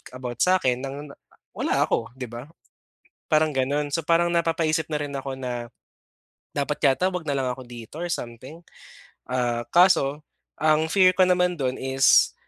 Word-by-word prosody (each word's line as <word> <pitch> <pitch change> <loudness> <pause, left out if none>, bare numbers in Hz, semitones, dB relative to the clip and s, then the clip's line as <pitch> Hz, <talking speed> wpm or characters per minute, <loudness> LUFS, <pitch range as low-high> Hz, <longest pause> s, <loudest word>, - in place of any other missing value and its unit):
about 125 -2 -6
sa 185 0 +4
akin 125 -1 +1
ng 135 0 -5 0.2
na - - -14 0.4
wala - - 0
ako, 115 - -1
'di 125 -3 -7
ba? 120 +3 -8 0.8
Parang 155 -1 +3
gano'n, 140 +3 0
so 165 - 0
parang 170 +2 +2
napapaisip 165 -1 0
na 150 - 0
rin 145 -1 -5
ako 135 -1 -5
na, 120 -2 -5 0.9
"Dapat 145 +1 -2
yata 180 +8 +1
wag 165 -4 -5
na 140 - 0
lang 130 -1 -1
ako 125 0 -10
dito 120 +5 -10
or 175 - -3
something." 130 +5 -6 0.7
Ah, 120 -2 0
kaso 170 -5 +4 0.4
ang 155 +1 +2
fear 185 0 +5
ko 190 - +3
naman 180 0 +2
dun 130 -2 -2
is, 135 0 +4
140 Hz, 170 wpm, -24 LUFS, 130-165 Hz, 0.9 s, fear